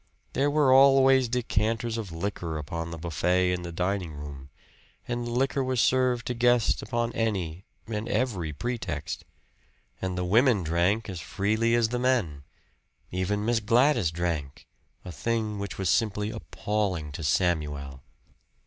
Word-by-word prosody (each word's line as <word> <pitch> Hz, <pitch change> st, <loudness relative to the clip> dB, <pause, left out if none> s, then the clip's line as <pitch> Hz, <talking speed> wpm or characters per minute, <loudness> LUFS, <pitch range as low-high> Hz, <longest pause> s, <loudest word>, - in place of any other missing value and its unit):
There 140 Hz, +2 st, +2 dB
were 145 Hz, -3 st, +4 dB
always 135 Hz, -1 st, +6 dB
decanters 115 Hz, -1 st, 0 dB
of 110 Hz, -6 st, -5 dB
liquor 85 Hz, -2 st, -3 dB
upon 80 Hz, +2 st, -4 dB
the 85 Hz, -, -6 dB
buffet 90 Hz, +3 st, +1 dB
in 90 Hz, -, -2 dB
the 85 Hz, -1 st, -6 dB
dining 90 Hz, -1 st, -2 dB
room; 70 Hz, -2 st, -9 dB, 0.6 s
and 120 Hz, 0 st, -3 dB
liquor 135 Hz, +3 st, 0 dB
was 130 Hz, -1 st, -1 dB
served 125 Hz, 0 st, +2 dB
to 125 Hz, -, -1 dB
guests 120 Hz, -1 st, +2 dB
upon 120 Hz, -1 st, -2 dB
any 95 Hz, -6 st, -2 dB, 0.2 s
and 110 Hz, +1 st, -4 dB
every 105 Hz, -11 st, -1 dB
pretext. 120 Hz, +10 st, -4 dB, 0.8 s
And 95 Hz, -1 st, -2 dB
the 90 Hz, -, -1 dB
women 110 Hz, +1 st, +4 dB
drank 85 Hz, +7 st, +1 dB
as 90 Hz, -5 st, -5 dB
freely 110 Hz, +8 st, +1 dB
as 115 Hz, -1 st, +2 dB
the 120 Hz, +1 st, -2 dB
men 105 Hz, -, 0 dB, 0.7 s
even 100 Hz, +3 st, -1 dB
Miss 120 Hz, 0 st, +2 dB
Gladys 115 Hz, -, +3 dB
drank, 80 Hz, -4 st, -3 dB, 0.4 s
a 90 Hz, -, -6 dB
thing 110 Hz, +1 st, -2 dB
which 100 Hz, 0 st, -5 dB
was 95 Hz, -, -1 dB
simply 105 Hz, +2 st, +1 dB
appalling 95 Hz, -11 st, -2 dB
to 75 Hz, +3 st, -6 dB
Samuel. 75 Hz, -4 st, 0 dB
105 Hz, 145 wpm, -27 LUFS, 85-120 Hz, 0.8 s, always